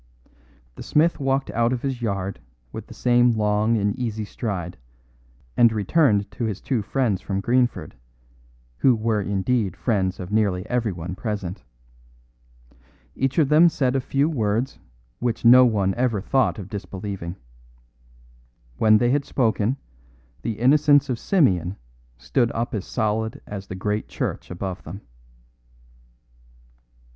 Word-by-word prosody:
The - - -11
smith 160 +3 +2
walked 135 0 0
out 115 +1 +1
of 125 -2 -2
his 135 -3 -3
yard 100 - -3 0.3
with - - -8
the - - -11
same 120 -1 +3
long 105 +2 +2
and 100 -1 0
easy 110 -3 -3
stride, 95 -5 -4 0.8
and 120 -1 +5
returned 105 - +2
to 120 - -4
his 105 -3 -3
two 125 -5 -1
friends 110 -2 -1
from 95 -1 -3
Greenford, 120 +4 0 0.8
who 130 - +4
were 110 -1 0
indeed 100 0 -1
friends 95 -6 0
of 90 +1 -7
nearly 100 -4 +1
everyone 95 -8 -2
present. 100 -2 -4 1.5
Each 135 0 -1
of 150 -5 +3
them 160 +3 +6
said 130 -5 0
a 135 - +1
few 140 +3 +1
words 115 -4 -1 0.4
which 120 -1 -2
no 125 +2 +8
one 100 -4 +1
ever 120 -3 0
thought 130 +6 +1
of 100 -4 -7
disbelieving. 95 -3 -6 1.4
When 110 +5 +5
they 120 +2 +2
had 145 +1 +1
spoken, 115 -1 0 0.6
the 110 - -3
innocence 145 +3 +4
of 120 -3 -2
Simeon 95 - +1 0.4
stood 90 - 0
up 115 +1 -3
as 100 -3 -3
solid 110 -1 -1
as 100 -1 -7
the 95 - -6
great 105 +3 -2
church - - -4
above 90 +1 -5
them. 95 +6 -9
110 Hz, 135 wpm, -23 LUFS, 100-125 Hz, 1.5 s, no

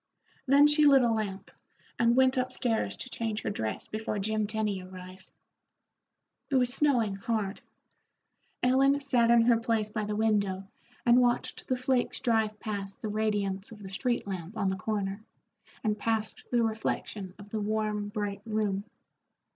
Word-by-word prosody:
Then 280 +2 +7
she 295 0 +5
lit 270 -2 +6
a 235 - +3
lamp, 210 -3 -3 0.5
and 235 0 +4
went 260 0 +4
up 255 0 0
stairs 240 -3 -1
to 255 - -7
change 220 -2 -3
her - - -1
dress 110 - -3
before 215 0 -3
Jim 215 +1 0
Tenny 210 -3 -1
arrived. 185 0 -11 1.2
It 275 - 0
was 250 -1 +2
snowing 245 -9 +2
hard. 205 -1 -2 1.0
Ellen 270 +3 +4
sat 250 -5 +3
in 235 -1 +6
her 235 -1 +4
place 225 -2 0
by 215 0 -3
the 210 0 -2
window 200 -3 +1 0.4
and 240 +1 +6
watched 245 -1 0
the 255 - 0
flakes 255 0 0
drive 220 -2 +1
past 200 -3 -5
the 215 - -2
radiance 205 -2 -1
of 210 -2 -11
the 190 - -7
street 240 +5 -1
lamp 190 +1 -6
on 195 -3 +1
the 190 - -1
corner, 200 +1 -3 0.6
and 210 -1 0
past 220 -1 -2
the 240 -1 +2
reflection 215 -3 -3
of 200 0 -13
the 220 - -2
warm, 210 -1 -1
bright 205 -2 -3
room. 210 -3 -1
215 Hz, 165 wpm, -29 LUFS, 200-240 Hz, 1.2 s, Then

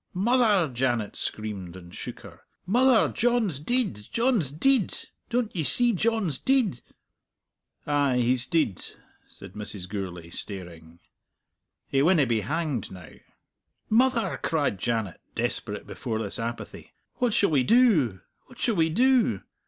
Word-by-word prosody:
"Mother!" 205 - +3
Janet 120 -4 -1
screamed, 100 -5 -5
and 85 -1 -12
shook - - -8
her. - - -13 0.2
"Mother, 245 +5 +4
John's 230 - +1
deid! 240 - 0 0.2
John's 230 - +1
deid! 220 - +1 0.3
Don't 235 -3 -1
ye 170 - 0
see 240 - +3
John's 210 - 0
deid?" 250 - +1 1.0
"Ay, 145 -3 +1
he's 125 +1 +2
deid," 150 - 0 0.4
said 95 -1 -12
Mrs. 105 -3 -6
Gourlay, 90 -4 -6
staring. 85 -4 -9 0.9
"He 135 - +1
winna 160 -1 +4
be 115 -3 0
hanged 150 - -2
now!" 90 -3 -11 0.8
"Mother!" 240 0 +2
cried 145 - 0
Janet, 110 -6 -2
desperate - - -2
before 110 - -4
this 110 -1 -2
apathy, 115 +1 -6 0.2
"what 245 -2 +1
shall 200 -4 +2
we 140 -4 +3
do? 160 - +3 0.3
what 250 - -16
shall 230 - 0
we 165 -1 +3
do? 235 - +2
145 Hz, 130 wpm, -26 LUFS, -, 1.0 s, Mother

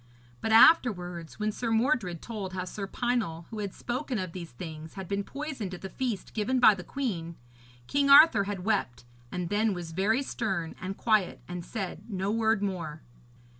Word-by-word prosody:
But 220 - -1
afterwards, 180 - +4
when 215 0 0
Sir 230 +2 -3
Mordred 225 - +1
told 205 -5 -5
how 185 -1 -3
Sir 195 +2 -5
Pinel, 210 -9 -1
who 220 - -5
had 200 -2 -3
spoken 250 +1 -3
of 185 -4 -3
these 170 -1 -7
things, 155 +4 -9
had 190 -2 -6
been 200 +1 -1
poisoned 270 -8 -5
at - - -12
the 190 - -7
feast 240 -4 -3
given 230 +4 0
by 230 -3 +8
the 185 -2 -7
queen, 175 -9 -3 0.5
King 280 - +1
Arthur 280 -8 +8
had 195 -2 -4
wept, 195 - -1 0.3
and 180 -2 -3
then 210 0 +1
was 170 -2 -6
very 210 +10 +1
stern 175 -11 -2
and 190 +1 -4
quiet 215 -5 +2
and 175 -1 -5
said 190 -1 -5
no 195 -1 -1
word 220 -2 +2
more. 165 -6 -4
200 Hz, 180 wpm, -29 LUFS, 180-230 Hz, 0.5 s, by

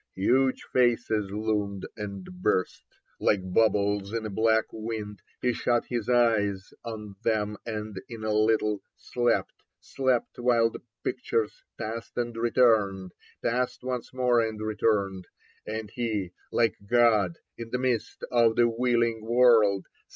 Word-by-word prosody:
Huge 130 +7 +2
faces 120 -4 +2
loomed 105 -2 -2
and 100 -3 -6 0.2
burst, 95 - -1 0.2
Like 95 -3 +1
bubbles 100 -1 +2
in 115 -1 -2
a 110 - -4
black 110 +2 +3
wind. 110 -2 -5 0.2
He 125 -1 +2
shut 120 +1 +1
his 120 -3 -3
eyes 105 -6 +2
on 105 -4 -7
them 105 -2 0
and 105 -3 -5
in 115 -2 -8
a 110 - -1
httle 105 -1 +2 0.2
Slept; 120 -1 0 0.3
slept, 130 -3 -1
while 120 -2 +3
the - - -9 0.2
pictures 110 -2 -2 0.2
Passed 115 +1 -6
and 120 -1 -2
returned, 110 -6 +2 0.3
passed 125 +1 -1
once 125 -2 -4
more 125 -2 +2
and 110 -1 -3
returned. 105 -3 0 0.4
And 110 -1 -4
he, 110 -7 -2 0.2
Hke 115 -4 +2
God 110 -6 +3 0.2
in 115 -1 -8
the 125 - -1
midst 125 -3 -2
of 115 -2 +4
the 120 - +4
wheehng 115 -1 +1
world. 110 -4 +4
110 Hz, 135 wpm, -27 LUFS, 105-120 Hz, 0.4 s, of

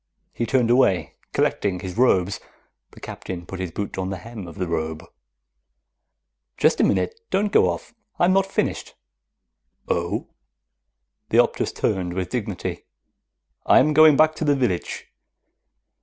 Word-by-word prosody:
He 120 - -2
turned 125 -3 +2
away, 95 -10 +2 0.2
collecting 95 -3 0
his 95 -2 -6
robes. 100 -6 +2 0.5
The - - -16
Captain 90 -2 -7
put 95 +1 -8
his 95 -1 -3
boot 95 +3 -5
on 95 0 -2
the 95 - -4
hem 105 0 -9
of 85 - -11
the 90 - -2
robe. 80 -1 -3 1.5
"Just 155 - +3
a - - +4
minute. 450 0 0
Don't 205 +1 0
go - - +4
off. - - -5 0.2
I'm 175 +2 +3
not 195 0 +3
finished." 195 - -2 0.9
"Oh?" - - -2 1.0
The - - +2
Optus - - +2
turned 90 -2 -2
with 90 -1 -3
dignity. 105 -6 -4 0.8
"I - - +6
am 150 +3 +4
going 155 -1 +7
back 155 0 +5
to - - -2
the 145 -2 +3
village." 120 -10 -2
100 Hz, 145 wpm, -23 LUFS, 90-145 Hz, 1.5 s, going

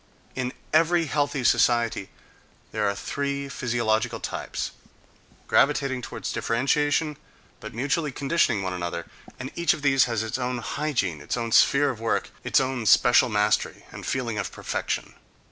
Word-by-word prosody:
In 130 -1 -2 0.2
every 165 +1 +4
healthy 145 -2 -1
society 115 -4 +2 0.6
there 105 -1 0
are 100 - -2
three 140 +5 -3
physiological 120 -4 0
types, - - -4 0.7
gravitating 130 -2 +2
toward - - -8
differentiation 145 +5 0 0.4
but - - -9
mutually 145 +4 0
conditioning 135 -7 +1
one 95 -1 -2
another, 85 -2 -4 0.3
and 130 +1 -6
each 170 0 +2
of 145 - -11
these 135 -3 +5
has 115 -3 -1
its 110 +4 -3
own 125 0 -1
hygiene, 120 - -2
its - - -3
own 115 -1 -3
sphere 140 +4 +5
of 115 - -9
work, 115 0 -1
its - - +3
own 130 -4 -1
special 120 +3 +6
mastery 105 0 0
and - - -9
feeling 120 -5 -2
of 100 - -3
perfection. - - -3
125 Hz, 145 wpm, -25 LUFS, 110-140 Hz, 0.7 s, special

